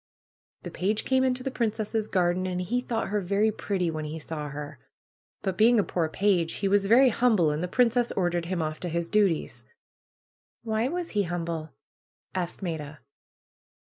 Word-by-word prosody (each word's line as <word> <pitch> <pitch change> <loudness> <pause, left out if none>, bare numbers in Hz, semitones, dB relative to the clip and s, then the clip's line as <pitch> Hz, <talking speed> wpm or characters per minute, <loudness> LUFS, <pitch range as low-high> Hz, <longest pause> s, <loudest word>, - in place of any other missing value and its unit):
^^The - - -7
page 210 +4 -1
came 260 -1 +3
into 255 -1 0
the 270 - -2
princess' 220 -2 -1
garden 185 -1 +1
and 180 -1 -2
he 225 +8 -1
thought 230 -2 -2
her 205 0 0
very 200 +4 +2
pretty 190 -5 -1
when 155 -1 -4
he 155 +2 -5
saw 150 -1 -5
her. 145 -1 -7 0.6
But 190 -2 -2
being 230 +1 +6
a - - +3
poor 165 -4 -1
page 180 -2 +1
he 195 - -1
was 200 0 +3
very 255 +5 +6
humble 215 -9 +3
and 150 +1 -2
the - - -1
princess 240 +3 +2
ordered 175 -2 0
him 175 -2 -1
off 155 0 -4
to 180 - -4
his 170 0 -2
duties.'^ 200 -6 +1 1.0
^^Why 220 +4 0
was 350 -1 -3
he 205 - +1
humble 170 -2 -3 0.3
?" - - -57
asked 185 +1 -3
Maida. 150 -5 -5
190 Hz, 180 wpm, -27 LUFS, 170-220 Hz, 1.0 s, being